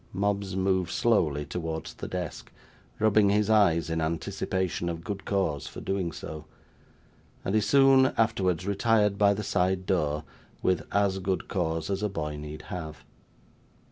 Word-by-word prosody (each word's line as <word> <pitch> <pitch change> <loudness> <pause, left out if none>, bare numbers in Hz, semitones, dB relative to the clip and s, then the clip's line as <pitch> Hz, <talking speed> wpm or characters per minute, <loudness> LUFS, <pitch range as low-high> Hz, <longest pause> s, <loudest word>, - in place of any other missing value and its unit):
Mobbs 100 -1 -1
moved 95 -1 +1
slowly 80 -12 +1
towards 80 -2 -4
the - - -7
desk, 90 -3 -5 0.5
rubbing 110 -1 +4
his 105 +1 +2
eyes 85 -7 +4
in 80 0 -1
anticipation 85 +2 -2
of 85 -1 -5
good 100 +1 -5
cause 95 -8 -1
for - - -8
doing 95 -3 -2
so; 80 -1 -8 1.0
and 95 - -1
he 110 - +4
soon 135 +4 +5
afterwards 95 -5 +1
retired 105 0 +2
by 100 -1 +5
the 105 - -4
side 95 -1 0
door, 75 -5 0 0.4
with 95 - +1
as 100 -1 +2
good 95 0 -2
cause 80 -4 -1
as 95 0 -1
a 105 - 0
boy 75 -5 -4
need 75 +1 -8
have. 80 -3 -7
95 Hz, 150 wpm, -28 LUFS, 80-100 Hz, 1.0 s, soon